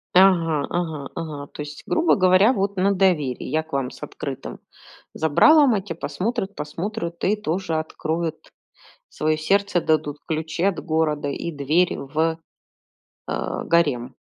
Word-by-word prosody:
Ага, 170 -6 +4
ага, 160 -5 -3
ага. 150 -4 -5
То - - -9
есть, 150 0 -8
грубо 330 +1 +3
говоря, 185 +5 +5
вот 200 -1 -1
на 200 +2 +3
доверии. 170 -10 +1
Я 160 0 0
к 160 - -24
вам 135 -2 0
с 135 - -12
открытым 140 -2 -6 0.6
забралом, 265 - +5
а 200 - 0
те 175 -5 -6
посмотрят, 200 +3 -3
посмотрют 170 +3 -5
и 205 +3 +3
тоже 185 -4 -2
откроют 160 +1 -3 0.7
своё 155 0 0
сердце, 195 +2 +2
дадут 155 -2 0
ключи 160 +2 -2
от 195 -1 +1
города 155 -3 0
и 170 +4 -4
дверь 155 +5 +1
в, 160 +4 -1 0.9
а, - - -3
гарем. 145 -8 +1
165 Hz, 145 wpm, -23 LUFS, 150-190 Hz, 0.9 s, говоря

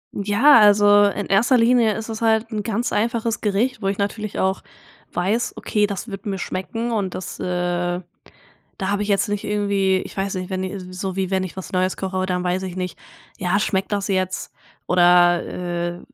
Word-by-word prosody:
Ja, 220 +7 +5
also, 205 -1 +6
in 200 0 -1
erster 230 +6 +3
Linie 230 -2 +3
ist 220 - -6
es 225 -1 -6
halt 225 0 +2
'n 215 -1 -2
ganz 225 +3 -2
einfaches 230 0 -1
Gericht, 220 +3 0
wo 195 - -1
ich 195 - -1
natürlich 210 +1 -3
auch 190 0 0 0.5
weiß: 200 +7 -1
„Okay, 210 -2 0
das 200 +3 -5
wird 195 -1 -7
mir 195 -1 -2
schmecken“ 225 +6 -4
und 200 -5 -2
das, 185 - -6
äh 175 0 -1 0.8
da 190 - -2
habe 205 +1 0
ich - - -5
jetzt 200 0 +2
nicht 205 0 -2
irgendwie 200 -2 +1
ich - - -11
weiß 195 0 -1
nicht, 185 0 -4
wenn 185 0 -2
i 190 +2 -4 0.2
so 185 0 -4
wie 190 -1 -1
wenn 190 0 +1
ich 185 - -7
was 190 - -7
Neues 185 0 0
koche, 190 -1 -2
dann 180 -1 -1
weiß 180 +1 -1
ich 185 -2 -5
nicht, 185 -1 -4 0.4
ja, 180 +3 +1
schmeckt 195 -1 -1
das 200 -1 -1
jetzt. 185 -1 -2 0.4
Oder, 175 -1 +5
äh, 175 0 -4
195 Hz, 195 wpm, -21 LUFS, 185-210 Hz, 0.8 s, also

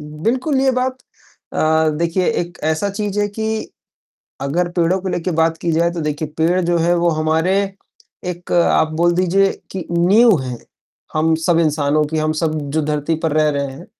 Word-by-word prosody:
बिल्कुल, 230 - -1
ये 270 -1 +3
बात 255 0 -1 0.6
अ, - - -4 0.3
देखिए 170 +4 0
एक 175 0 -6
ऐसा 160 +6 0
चीज़ 205 0 -3
है 205 - +2
कि 220 +1 -3 0.7
अगर 170 +6 0
पेड़ों 175 +2 +1
को 190 - -4
लेके 180 0 -2
बात 165 0 +2
की 170 - -2
जाए 170 +2 +2
तो, 170 - -4
देखिए, 150 0 -3
पेड़ 175 +3 +2
जो 175 0 +1
है, 170 +2 +2
वो 170 0 +2
हमारे 160 +4 +1 0.7
एक 175 0 -5
आप 160 -2 +3
बोल 175 0 +4
दीजिए 185 +2 +2 0.2
कि 185 -3 -4
नींव 190 +4 +4
हैं, 125 -2 -5 0.6
हम 160 +1 +2
सब 170 -2 +3
इंसानों 150 -1 +1
की, 155 +1 -3
हम 155 0 +1
सब 155 -1 +1 0.2
जो 155 0 +1
धरती 150 +1 -1
पर 160 - +1
रह 155 0 +3
रहे 140 -1 -2
हैं, 160 +7 -11
170 Hz, 185 wpm, -18 LUFS, 155-185 Hz, 0.7 s, बोल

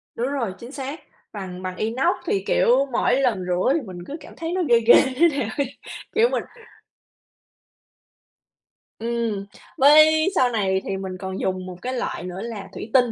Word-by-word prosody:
Đúng 240 +2 -1
rồi, 260 -8 -2
chính 235 +3 -10
xác, 280 +2 -6 0.3
bằng 185 -3 -7
bằng 185 0 -4
inox 230 +5 +1
thì, 195 - 0
kiểu, 260 +4 +3
mỗi 250 +2 +2
lần 210 -8 0
rửa 180 +9 +1
thì 320 - 0
mình 185 -6 -9
cứ 295 - -6
cảm - - -13
thấy 330 0 -4
nó 370 - 0
ghê 235 - +6
ghê 230 +1 +6 0.2
thế 335 +6 +5
nào 225 -5 -2
ấy, 275 -1 -2 0.4
kiểu, 455 +2 +4
mình - - -1 2.6
Ừm, 230 -3 -2 0.3
với 310 +3 +6
sau 250 -1 +4
này 190 -4 0
thì 195 0 -3
mình 190 -1 -5
còn 190 0 -5
dùng 185 -1 -2
một 185 -1 -7
cái 255 +1 -3
loại 245 -7 -3
nữa 180 +1 -6
là 220 -4 -6
thủy - - -7
tinh, 250 -3 +4
235 Hz, 185 wpm, -23 LUFS, 190-270 Hz, 2.6 s, ghê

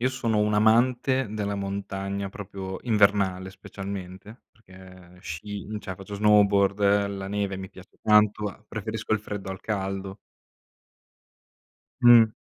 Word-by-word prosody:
Io 130 - +2
sono 115 -5 -1
un 105 0 +2
amante 120 +4 +3
della 100 -1 -2
montagna 100 0 -4
proprio 95 -2 -7
invernale, 100 -4 +2
specialmente, 95 +2 -8
perché 95 -3 -16
sci 100 +5 -6
cioè 95 -3 -7
faccio 100 +2 -9
snowboard, 100 -1 +4
la 100 -1 -5
neve 100 -1 -2
mi 95 0 -7
piace 95 0 -16
tanto, 105 -1 +2
preferisco 110 +1 -4
il 110 - +2
freddo 105 -2 -6
al 95 - -7
caldo. 95 -1 -4 1.8
Mh. 120 -2 +8
100 Hz, 120 wpm, -26 LUFS, 95-105 Hz, 1.8 s, Mh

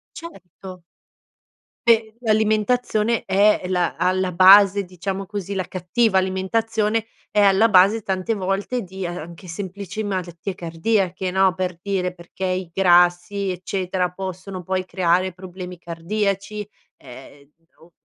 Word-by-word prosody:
Certo. 185 - -11 1.1
E 220 -1 +3
l'alimentazione 220 +1 +1
è 205 +2 +3
la 180 -2 0
alla 185 0 +1
base 195 +2 +7
diciamo 190 +2 -5
così, 200 0 -5
la 185 - -1
cattiva 190 +4 +1
alimentazione 215 +4 -1 0.2
è 210 - +3
alla 200 +3 +5
base 200 +3 +5
tante 190 +4 -1
volte 200 +6 -2
di, 190 +1 -8
ehm, 175 0 -4
anche 170 +3 -10
semplici 195 +4 -6
malattie 185 -2 -4
cardiache, 185 +2 -1
no, 190 -1 +3
per 180 -2 -3
dire 185 -3 -2
perché 180 +2 -7
i 185 -1 -2
grassi, 175 +2 +3
eccetera, 185 0 -2
possono 185 0 -6
poi 185 +1 -2
creare 185 0 +1
problemi 180 -1 -9
cardiaci 200 +4 -3 0.3
ehm, 140 +3 -14 0.3
o 165 0 -21
190 Hz, 125 wpm, -22 LUFS, 180-205 Hz, 1.1 s, base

